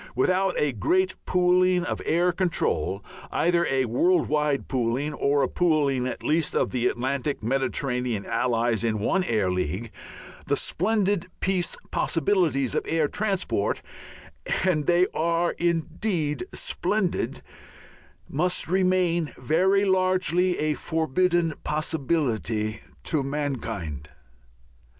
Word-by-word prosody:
Without 185 +8 +2
a 150 - +2
great 185 - +1
pooling 180 0 +3
of - - -3
air 175 +2 +3
control, 135 - -1 0.3
either 170 0 +2
a 135 -1 +1
world 170 +11 +2
wide 150 -2 0
pooling 130 +4 -1
or 140 -1 +1
a - - +2
pooling 145 -7 +1
at 130 - -5
least 160 0 +1
of - - +1
the 125 -1 +1
Atlantic 130 +2 -2
Mediterranean 125 -3 -1
Allies 115 -1 0
in 110 -2 0
one 185 - +1
Air 105 - 0
League, 90 +5 -2 0.6
the - - +2
splendid 200 -1 0
peace 185 -2 0
possibilities 160 - +1
of - - 0
air 160 -2 +1
transport 185 - -1 0.8
and 155 -6 +1
they 175 +1 +4
are 170 +2 +1
indeed 170 - -1
splendid 215 - -1 0.8
must 180 +5 -1
remain 180 -3 +1
very 185 +10 +2
largely 185 -1 +2
a 155 0 0
forbidden 165 +2 +1
possibility 130 -8 -1 0.2
to 155 - 0
mankind. 115 - -4
155 Hz, 115 wpm, -25 LUFS, 125-180 Hz, 0.8 s, they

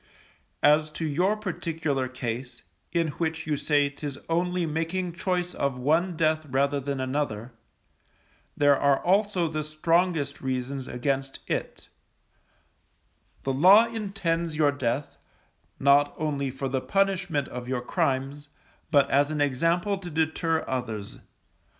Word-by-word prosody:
As 155 +1 +4
to 160 - -3
your 180 +8 +1
particular 165 -8 -2
case, 125 -1 -5 0.3
in 165 -2 +1
which 160 -2 -2
you 150 -1 0
say 145 0 +2
'tis 140 0 -6
only 175 +1 +1
making 165 +3 -2
choice 180 0 -1
of 140 -2 -1
one 160 +7 +1
death 155 -1 +1
rather 140 +2 +1
than 140 0 -3
another, 130 -4 -2 1.0
there 145 -1 +5
are 140 0 +3
also 195 -1 +2
the 155 -1 -3
strongest 155 -1 0
reasons 130 0 -3
against 135 +2 -2
it, - - -4 1.6
The 135 - -1
Law 190 - +7
intends 170 -7 -2
your 150 -2 +3
death, 140 0 -3 0.6
not 140 +1 +4
only 145 -3 -1
for 135 +1 -4
the 130 0 -1
punishment 195 -6 0
of 125 -1 -7
your 125 -1 -1
crimes, 135 +3 -1 0.4
but 145 -3 +4
as 140 +1 +3
an 155 -1 -2
example 165 +8 +1
to 180 -2 -7
deter 160 +1 0
others. 115 -6 -4
150 Hz, 130 wpm, -26 LUFS, 135-170 Hz, 1.6 s, Law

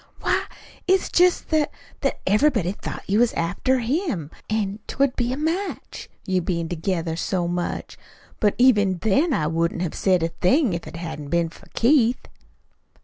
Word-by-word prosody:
"Why, - - +1 0.4
it's 380 0 +3
jest 360 0 +3
that 310 -2 +2 0.3
that - - -1
everybody 210 - +3
thought 205 - -7
you 205 +3 +2
was 240 -1 +3
after 185 +10 0
him, 240 - -2 0.2
an't 210 -1 -3
would 275 -1 +2
be 245 -1 0
a 260 - -2
match 335 +6 -3 0.2
you 185 -1 +1
bein' 170 -1 -2
together 165 -1 -2
so 175 +1 -1
much. 175 0 -3 0.4
But 205 -2 +2
even 205 -7 +4
then 245 - +2
I 155 - +1
wouldn't 165 +2 0
have 170 - -3
said 185 -3 +2
a 165 - +1
thing 230 - +2
if 170 - -4
it - - -9
hadn't 160 -4 -6
been 170 +1 +1
for - - -17
Keith." 245 -1 +3
200 Hz, 165 wpm, -23 LUFS, 170-260 Hz, 0.4 s, even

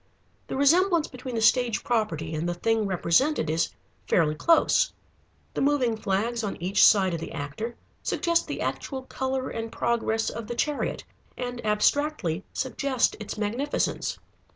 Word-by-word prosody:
The - - -4
resemblance 335 +3 +4
between 255 -1 -7
the 225 - 0
stage 235 -3 +3
property 170 -10 -1
and 160 +3 -1
the 175 - -2
thing 220 +3 +1
represented 185 - +2
is 160 +1 +1 0.4
fairly 155 -4 +3
close. 330 - +3 0.6
The - - -2
moving 270 -5 +2
flags 220 +3 -1
on 205 - -2
each 185 +3 +3
side 190 -3 +6
of 165 - -2
the 165 - -7
actor 150 +12 -5 0.3
suggest 340 -1 +1
the - - -4
actual 265 -2 -3
color 260 0 -3
and 225 0 -4
progress 225 -1 0
of 230 -1 -6
the 240 - -4
chariot, 295 +4 -1 0.3
and 245 -1 -4
abstractly 210 - +1
suggest 260 -1 0
its 215 0 -6
magnificence. 235 +8 -1
230 Hz, 150 wpm, -26 LUFS, 195-265 Hz, 0.6 s, side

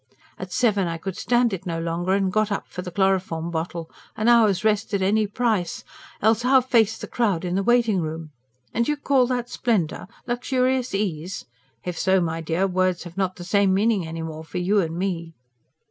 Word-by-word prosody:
At - - -7
seven 205 -6 +2
I 165 0 -3
could 185 +2 -5
stand 240 -1 +2
it 190 0 -5
no 165 -1 -2
longer 170 +3 -1
and 195 -1 +1
got 215 -1 +1
up 200 - -2
for 180 - -6
the 180 - -6
chloroform 180 -3 0
bottle: 165 0 -4 0.3
an 215 - 0
hour's 220 -5 +4
rest 210 -1 +1
at 195 - 0
any 210 +2 +2
price 210 -5 -1 0.4
else 220 +1 +4
how 260 +2 +5
face 230 -4 +2
the - - -6
crowd 200 -8 0
in 175 - -2
the 195 - +1
waiting 230 -3 +3
room? 160 0 -5 0.4
And 235 - +1
you 295 - 0
call 275 -3 +2
that 245 -1 -1
splendour? 205 -12 -1 0.2
luxurious 255 0 0
ease? 180 -3 -3 0.4
If 180 -2 -4
so, 190 0 +3
my 165 -1 -2
dear, 165 +4 0
words 185 -1 0
have 175 -2 -10
not 190 -1 -1
the 175 - -9
same 195 +1 +2
meaning 205 -4 +1
any 165 0 -5
more 160 -1 -6
for 160 - -7
you 190 +4 +2
and 165 -3 -1
me." 170 -3 -3
195 Hz, 200 wpm, -24 LUFS, 170-220 Hz, 0.4 s, how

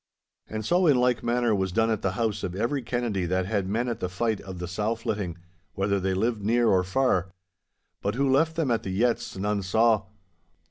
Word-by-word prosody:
And 110 -1 -5
so 180 +5 +3
in 145 -4 +5
like 125 -1 +2
manner 120 -1 +1
was 95 -2 0
done 115 +4 +2
at 110 -1 -1
the 95 -3 0
house 110 -1 -1
of 90 -1 -3
every 120 +7 -1
Kennedy 115 -7 -2
that 95 +1 0
had 100 -1 -1
men 115 +4 0
at 120 -3 -3
the 90 - -2
fight 110 +3 -1
of 95 -1 -8
the 90 0 -5
sow 105 +5 -1
flitting, 100 -6 -3 0.4
whether 100 +1 +1
they 95 0 -1
lived 110 +2 0
near 115 +3 +2
or 95 -1 +3
far. 95 -2 +1 0.7
But 100 +2 -1
who 140 +2 +1
left 160 +5 +3
them 160 -6 0
at 115 - +1
the - - -5
yetts, 115 +2 0
none 100 +1 -1
saw. 110 +2 +2
110 Hz, 215 wpm, -26 LUFS, 95-120 Hz, 0.7 s, in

